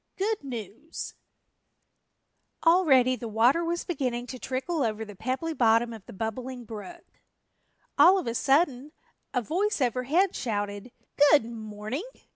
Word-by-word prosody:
GOOD 415 -2 -1
NEWS 245 - -7 1.5
ALREADY 280 -8 +5
the 240 - -6
water 235 +9 +3
was 340 +1 -2
beginning 255 -8 -2
to 255 +1 -8
trickle 270 +7 -2
over 220 -2 -1
the 205 -1 -11
pebbly 260 - -2
bottom 230 -3 +3
of 220 -3 -10
the - - -9
Bubbling 240 +4 -5
Brook. 235 +11 -9 0.9
All 375 +2 +8
of 375 - -2
a 230 - -2
sudden 280 +1 +1 0.4
a 250 -2 -1
voice 390 - 0
overhead 265 - +1
shouted, 205 -1 -3 0.4
"Good 290 -7 +5
morning!" 220 +3 -5
255 Hz, 130 wpm, -27 LUFS, 225-320 Hz, 1.5 s, All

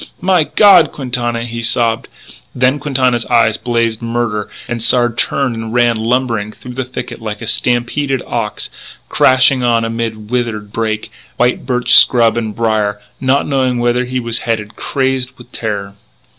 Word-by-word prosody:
"My 180 -3 +2
God, 185 -6 +5
Quintana 120 -3 -2
" - - -4
he 115 0 -5
sobbed. 115 -1 +1 0.5
Then 130 +3 +2
Quintana's 130 -4 +1
eyes 115 -3 +3
blazed 115 -2 -1
murder: 115 -3 -2 0.2
and 120 -1 -4
Sard 120 0 +2
turned 130 0 0
and 115 +1 -5
ran 120 -1 +3
lumbering 115 -2 -1
through 125 +3 -11
the 130 +1 -3
thicket 125 -1 -7
like 105 -2 -5
a - - -7
stampeded 125 +4 0
ox, 115 -3 -3 0.4
crashing 130 0 +4
on 115 -2 +2
amid 115 -1 -4
withered 115 -4 -2
brake, 110 -1 -2 0.3
white 125 0 0
birch 125 -1 +1
scrub 115 -3 +6
and 110 -3 -3
brier, 110 -3 0 0.2
not 135 +1 +1
knowing 130 -3 0
whither 120 +1 +1
he 130 +1 -2
was 115 -1 -2
headed, 110 -2 -3
crazed 130 -2 -2
with 120 0 -15
terror. 100 -4 -4
120 Hz, 155 wpm, -15 LUFS, 115-125 Hz, 0.5 s, scrub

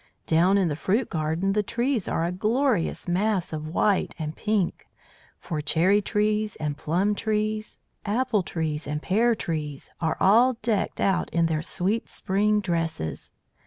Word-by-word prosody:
"Down 175 +5 +4
in 190 -3 +2
the 150 - -1
fruit 210 - 0
garden, 160 +5 0
the 210 - +2
trees 235 +1 -1
are 165 - 0
a 170 - -1
glorious 215 +1 0
mass 190 0 0
of 155 0 -4
white 190 +4 +1
and 155 -1 -4
pink; 210 -4 -1 0.5
for 155 -4 -4
cherry 180 +7 +3
trees 210 0 0
and 150 -1 -3
plum 180 +8 0
trees, 215 0 -2 0.3
apple 225 0 +1
trees 155 -4 -3
and 150 +1 -2
pear 225 +8 +2
trees, 150 -7 -4
are 160 -1 0
all 235 +7 +5
decked 220 -3 0
out 195 - +1
in 170 0 +1
their 160 -2 0
sweet 195 +7 -1
spring 210 +2 +1
dresses. 165 - -3
190 Hz, 155 wpm, -25 LUFS, 160-215 Hz, 0.5 s, all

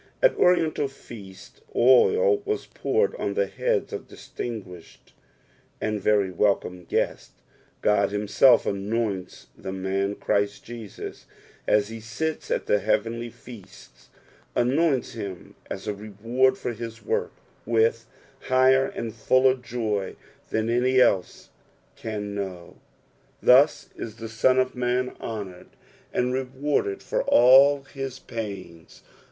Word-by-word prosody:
At - - +4
Orienlal 165 -5 +2
feasts 105 -8 -13
oil 415 - +5
wsa 415 +1 -4
poured 455 +2 +1
on - - -2
the 475 - +2
heads - - -1
of - - -6
distinguished 95 -8 -9 0.7
and 110 -1 -2
very 100 -2 +2
welcome 90 -1 0
guests; - - -2 0.5
Ond 100 -1 +3
himself 105 +5 +4
anoints 100 -1 -3
the 95 - -7
man 95 +1 -2
Christ 100 0 -1
Jesus, 115 -3 -9 0.4
AS 105 0 +3
he 115 0 -7
sits 135 +9 -4
at - - -1
the 105 - +2
jicavenly 115 +3 -1
fea 115 -4 -12
sts, 95 - -18 0.5
anoints 135 +2 +1
him 100 -5 -7 0.2
as - - -6
n 105 -1 -2
reward 115 +6 +1
for 125 - -4
his 115 -1 -8
work, - - -1 0.3
with 115 0 +1 0.4
higher 130 +1 +4
and 115 -2 -5
fuller 130 +3 +3
joy 115 -6 -3 0.3
than 110 0 -1
any 125 +2 +2
else 95 -7 +1 0.4
can 105 -2 -5
know; 95 -4 -6 0.6
thus 135 +5 +5
is 110 -2 -7
the 115 -1 -8
Son 115 +3 +2
of 130 0 +2
man 125 0 -1
honoured 100 -5 -6 0.4
an^ 125 +1 0
rewarded 140 - -1
fsr - - -1
all 135 +3 +6
his 135 -1 -6
pains. 100 -9 -8
115 Hz, 125 wpm, -25 LUFS, 105-130 Hz, 0.7 s, all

